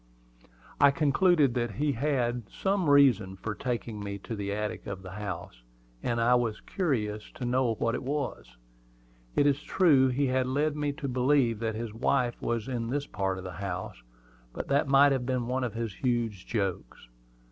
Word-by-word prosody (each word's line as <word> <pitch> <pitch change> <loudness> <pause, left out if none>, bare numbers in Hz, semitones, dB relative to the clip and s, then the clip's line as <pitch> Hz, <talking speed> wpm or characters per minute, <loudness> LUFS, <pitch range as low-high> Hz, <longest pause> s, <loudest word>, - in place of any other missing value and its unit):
I 145 - +7
concluded 150 -1 +3
that 120 -3 -1
he 150 +1 +1
had 120 -4 -1
some 190 -5 0
reason 120 -10 +5
for 105 +3 -4
taking 120 -2 -4
me 100 -1 -4
to 115 - -5
the 100 -1 -3
attic 105 +1 -3
of 100 -1 -6
the 90 - -8
house, 90 -11 -6 0.4
and 120 -1 -1
I 120 +2 +4
was 120 -3 +1
curious 110 - -2
to 125 - -5
know 125 -1 +1
what 115 +2 0
it - - -2
was. 130 - -4 0.8
It 145 - +4
is 145 0 +2
true 145 -8 +4
he 130 +2 +1
had 130 -1 +1
led 145 +3 0
me 145 -1 -1
to 140 -1 -5
believe 125 -3 +2
that 110 -1 -2
his 115 -1 -5
wife 120 +1 0
was 115 0 -2
in 120 -3 -3
this 140 +2 -1
part 95 -5 -2
of 95 - -7
the 95 - -6
house; 95 -9 -5 0.5
but - - -5
that 140 +1 +2
might 140 +1 +6
have 130 -2 -1
been 125 -2 0
one 130 +2 -1
of 120 -3 -3
his 115 -3 -3
huge 115 -5 -2
jokes. 95 - -3
120 Hz, 185 wpm, -29 LUFS, 105-140 Hz, 0.8 s, I